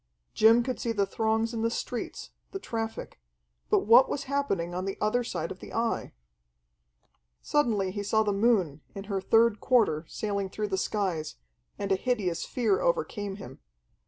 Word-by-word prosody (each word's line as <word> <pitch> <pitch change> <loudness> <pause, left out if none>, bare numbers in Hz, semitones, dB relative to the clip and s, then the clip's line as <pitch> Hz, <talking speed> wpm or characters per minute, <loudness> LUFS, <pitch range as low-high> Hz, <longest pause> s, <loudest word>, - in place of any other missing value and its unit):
Jim 225 +2 +5
could 255 +1 -3
see 235 - -1
the 205 -3 +1
throngs 220 +3 0
in 225 - -2
the 230 - +2
streets, 240 +1 -5 0.2
the - - -2
traffic. 225 - -5 0.5
But - - +4
what 235 +5 +7
was 280 - -2
happening 230 -12 -1
in 180 +1 -3
the 195 - -3
other 230 +4 +1
side 170 -8 -4
of 185 - -8
the - - -11
Eye? 230 0 -1 1.3
Suddenly 215 -10 +1
he 205 +1 -4
saw 220 +2 +2
the 205 -1 0
moon 195 -9 +2
in 195 - -5
her 195 -1 -3
third 225 +2 +3
quarter 210 -11 +2
sailing 200 -2 -3
through 210 +2 -3
the 190 - 0
skies, 185 -7 -2 0.4
and 200 -1 -3
a - - +5
hideous 195 -5 -1
fear 280 - +1
overcame 455 - -1
him. 135 -10 -10
215 Hz, 170 wpm, -28 LUFS, 195-235 Hz, 1.3 s, what